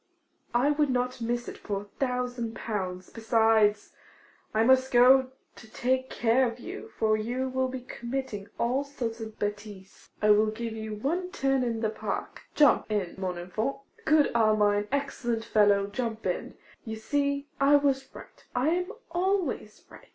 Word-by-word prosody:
I 265 +5 +4
would 295 -1 +2
not 250 -1 -1
miss 240 +1 -2
it - - -8
for 200 -2 -3
a 205 0 -18
thousand 250 -3 -2
pounds. 185 -4 -4
Besides, 220 -2 +2 0.6
I 220 +1 +2
must 260 +2 +4
go 255 +2 +6 0.3
to 220 - -13
take 260 +1 0
care 245 +2 +2
of 230 0 -5
you, 390 - -8
for 215 -1 +3
you 245 +5 -2
will 260 0 0
be 255 0 -5
committing 240 -4 -5
all 250 +4 +1
sorts 240 -5 -5
of 220 -1 -7
bêtises. 205 -2 -6
I 210 0 +4
will 215 +1 +5
give 225 +1 -4
you 220 -1 -5
one 335 - -2
turn 270 -7 +1
in 230 -2 -2
the 220 -2 0
park. 220 - -5
Jump 290 -6 +4
in, 200 -5 -1
mon 185 -2 -2
enfant. 215 +9 -2 0.3
Good 310 -5 +4
Armine, 210 -2 +3
excellent 240 -5 -2
fellow, 205 -3 +4
jump 225 +2 -4
in! - - -3 0.3
You 220 -2 -5
see, 280 +5 -1
I 280 +1 +5
was 275 -2 +2
right; - - -13
I 250 +5 +2
am 360 +2 0 0.2
always 350 - -1
right. - - -16
235 Hz, 165 wpm, -28 LUFS, 215-265 Hz, 0.6 s, go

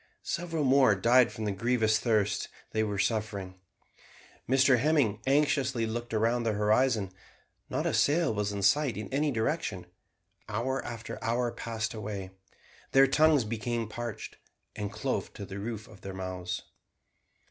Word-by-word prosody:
Several 165 -3 -2
more 130 -5 +5
died 120 +4 +4
from 110 - -5
the 105 - 0
grievous 110 +1 +2
thirst 110 -4 +1 0.2
they 110 - 0
were 105 -2 -2
suffering. 100 -3 -2 0.9
Mr 130 -1 +5
Hemming 130 -7 +2
anxiously 135 -4 +2
looked 120 +1 -4
round 115 +2 +1
the 115 -2 +1
horizon. 105 -1 +2 0.6
Not - - -2
a - - +1
sail 160 -3 +3
was 105 0 -1
in 100 -1 -4
sight 140 +2 +3
in 105 +3 -6
any 150 +2 +2
direction. 110 - -2 0.6
Hour 130 +5 -1
after 115 -1 -7
hour 120 +1 0
passed 115 -2 -4
away. 100 -3 -5 0.6
Their 135 0 +7
tongues 150 0 +4
became 115 +1 -2
parched, 120 -1 -6 0.4
and 105 -2 -4
clove - - -3
to 100 - -7
the 95 +1 -7
roofs 110 +1 -5
of 110 - -16
their 95 -1 -7
mouths. 90 -1 -4
115 Hz, 145 wpm, -29 LUFS, 105-130 Hz, 0.9 s, Their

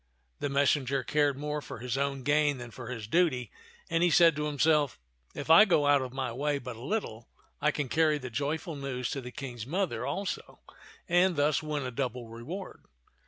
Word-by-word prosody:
The 145 - -1
messenger 140 -1 +2
cared 145 -1 +1
more 150 +1 -3
for - - -8
his 125 +2 -3
own 140 -1 -1
gain 145 0 +2
than 120 -1 -8
for 130 -2 -9
his 115 -4 -5
duty, 130 -4 +1 0.4
and 165 0 0
he 175 - +4
said 165 -1 +6
to 150 0 -2
himself, 150 - +2 0.2
" - - -36
If 145 +2 -2
I 165 +6 +10
go 170 -8 +3
out 145 -1 +5
of 130 -1 -5
my 130 -2 -3
way 145 +4 -1
but 125 -3 -7
a 115 - -12
little, 125 - -3 0.3
I 150 - +4
can 145 -2 -2
carry 155 +2 +2
the 130 -3 -7
joyful 150 +5 -2
news 135 -3 -3
to 135 - -3
the 125 - -7
King's 120 -3 -7
mother 185 +5 -1
also, 195 -1 -4 0.5
and 175 0 +3
thus 145 0 +2
win 150 -2 -3
a 125 - -3
double 125 -2 -3
reward." 150 - -7
145 Hz, 205 wpm, -29 LUFS, 125-155 Hz, 0.5 s, I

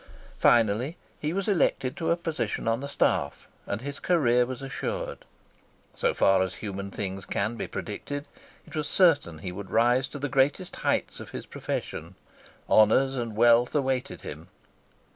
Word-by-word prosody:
Finally 120 - +3 0.2
he 150 - -1
was 195 +2 -2
elected 160 -9 +1
to 165 - -2
a 170 - +3
position 155 -12 -3
on 115 0 +2
the 140 - -5
staff, 70 - 0 0.2
and 100 +2 -3
his 140 +2 -6
career 125 -9 +3
was 130 +1 -6
assured. 135 - -4 0.7
So - - +1
far 95 -1 +4
as 95 - -1
human 100 -2 -5
things 95 -1 -4
can 110 +4 -1
be - - -4
predicted, 145 +7 -5 0.4
it - - -11
was 150 -1 -1
certain 155 - +4
that 80 - -13
he 90 - -3
would 95 +1 -7
rise 120 +3 +3
to 145 - -7
the 145 +1 -2
greatest 145 +6 +1
heights - - 0
of - - -9
his - - -7
profession. - - -5 0.5
Honours 130 +5 +5
and 115 -4 -3
wealth 120 +3 +5
awaited 135 -3 -1
him. 80 +3 -8
125 Hz, 165 wpm, -27 LUFS, 105-145 Hz, 0.7 s, Honours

